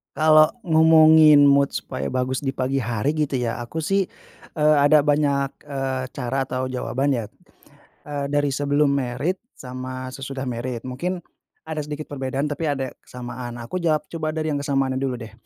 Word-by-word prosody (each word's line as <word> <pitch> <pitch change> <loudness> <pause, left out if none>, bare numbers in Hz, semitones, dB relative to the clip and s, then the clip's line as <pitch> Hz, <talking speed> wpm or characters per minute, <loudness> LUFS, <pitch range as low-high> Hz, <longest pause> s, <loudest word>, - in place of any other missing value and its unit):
Kalo 155 +7 +4
ngomongin 160 -3 +6
mood 140 0 +3
supaya 65 +2 -4
bagus 130 - -1
di 135 - -1
pagi 130 +1 -1
hari 120 +4 -1
gitu 150 -2 -1
ya 120 -3 -1
aku 120 +7 -5
sih, 195 +4 +1 0.5
eee, 155 -1 +3
ada 150 +1 +6
banyak, 145 -1 +1 0.2
eee, 135 -2 -3
cara 135 +1 -2
atau 130 0 -3
jawaban 130 +2 -1
ya, 115 - -3 0.8
eee, 145 -1 -4
dari 145 -1 +1
sebelum 145 +1 +2
married 140 +7 -1 0.2
sama 130 0 -7
sesudah 135 0 -6
married, 120 -1 -4
mungkin 175 +8 -4 0.4
ada 160 -1 -4
sedikit 150 +1 -5
perbedaan 135 0 -2
tapi 150 +2 -2
ada 135 -3 -2
kesamaan, 120 -1 -8
aku 120 +10 -5
jawab 155 -3 +1
coba 155 -1 -4
dari 155 -1 -1
yang 145 - -1
kesamaannya 135 -2 0
dulu 135 -2 -1
deh, 110 - -12
140 Hz, 165 wpm, -23 LUFS, 130-155 Hz, 0.8 s, ngomongin